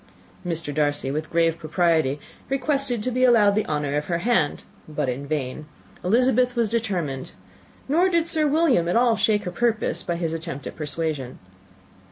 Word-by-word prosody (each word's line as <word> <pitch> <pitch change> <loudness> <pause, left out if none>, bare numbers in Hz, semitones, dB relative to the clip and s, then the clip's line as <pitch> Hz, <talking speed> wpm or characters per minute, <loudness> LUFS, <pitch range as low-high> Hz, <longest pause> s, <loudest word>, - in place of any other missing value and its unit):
Mr. 165 -4 -3
Darcy, 145 -2 0
with 155 +1 -3
grave 165 0 +1
propriety, 160 -3 +1 0.3
requested 270 -3 0
to 255 - -1
be 255 +1 +1
allowed 225 -5 +5
the 215 +1 0
honour 145 -2 -1
of 150 0 -2
her 170 - 0
hand, 170 -6 +1 0.2
but 150 -3 -2
in 130 +3 -3
vain. 150 0 -3 0.4
Elizabeth 250 +4 +3
was 230 -3 +1
determined; 180 - -2 0.5
nor 340 +7 +3
did 335 -2 +2
Sir 315 -2 +1
William 290 - +3
at - - 0
all 235 -1 +4
shake 210 -1 +1
her 180 - -4
purpose 225 +3 0
by 170 - -2
his 165 -1 -2
attempt 165 -3 -6
at - - -6
persuasion. 150 -4 -4
175 Hz, 170 wpm, -24 LUFS, 150-240 Hz, 0.5 s, allowed